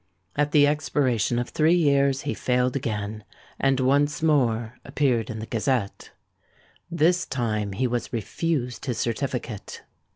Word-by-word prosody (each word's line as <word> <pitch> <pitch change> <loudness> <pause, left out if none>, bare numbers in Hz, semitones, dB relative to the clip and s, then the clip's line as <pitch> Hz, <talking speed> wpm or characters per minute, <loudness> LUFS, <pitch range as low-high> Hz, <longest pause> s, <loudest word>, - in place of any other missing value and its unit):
At 150 0 +1
the 145 -1 +6
expiration 135 -6 +1
of 120 0 -2
three 160 +3 +3
years 140 -4 +3
he 145 - -2
failed 125 0 0
again, 105 -4 -3 0.4
and 135 -1 +2
once 145 +5 +2
more 120 -6 +1
appeared 135 -5 0
in 115 - -5
the 110 - -5
Gazette. 115 -2 -2 0.8
This 170 +2 +2
time 110 -5 -2
he 130 +7 -1
was 120 -1 -2
refused 125 - -2
his 125 - -1
certificate. 120 -3 -4
130 Hz, 135 wpm, -25 LUFS, 115-145 Hz, 0.8 s, the